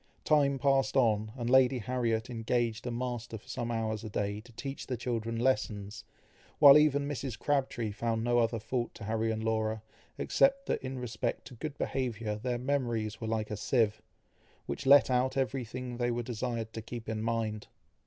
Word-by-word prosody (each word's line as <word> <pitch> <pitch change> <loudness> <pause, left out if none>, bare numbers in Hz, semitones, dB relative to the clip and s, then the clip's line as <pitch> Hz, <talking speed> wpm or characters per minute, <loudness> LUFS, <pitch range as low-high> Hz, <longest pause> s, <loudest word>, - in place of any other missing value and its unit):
Time 140 -3 +3
passed 135 -1 +2
on, 110 -4 +2
and 120 -2 -3
Lady 130 0 +5
Harriet 115 -1 -1
engaged 120 0 -1
a - - -2
master 120 -2 -4
for 105 - -19
some 120 -2 -3
hours 110 -2 -2
a 110 - -5
day 105 0 -2
to 120 - -17
teach 135 +4 -6
the 125 - -2
children 115 -1 -2
lessons, 110 -4 -1 0.5
while 140 -2 +10
even 145 -2 +4
Mrs. 135 -4 -4
Crabtree 130 -6 0
found 115 +1 -1
no 120 0 +3
other 115 0 +1
fault 120 +2 -3
to 110 - -9
Harry 110 +2 0
and 110 0 -2
Laura, 110 -1 -1 0.3
except 275 0 +2
that - - -1
in 130 0 -5
respect 115 -3 -3
to - - -10
good 145 +4 -6
behaviour 115 -7 -2
their 120 +2 -2
memories 120 -5 -1
were 110 - -3
like 110 -1 -2
a 105 - -2
sieve, 110 -1 +1 0.6
which 70 - -4
let 140 -1 +7
out 130 +2 +1
every 135 -1 0
thing 125 +1 -6
they 120 0 0
were 120 0 -1
desired 115 -1 -3
to 110 - -5
keep 115 0 -8
in 110 -1 -2
mind. 110 -2 -2
120 Hz, 185 wpm, -31 LUFS, 110-130 Hz, 0.6 s, while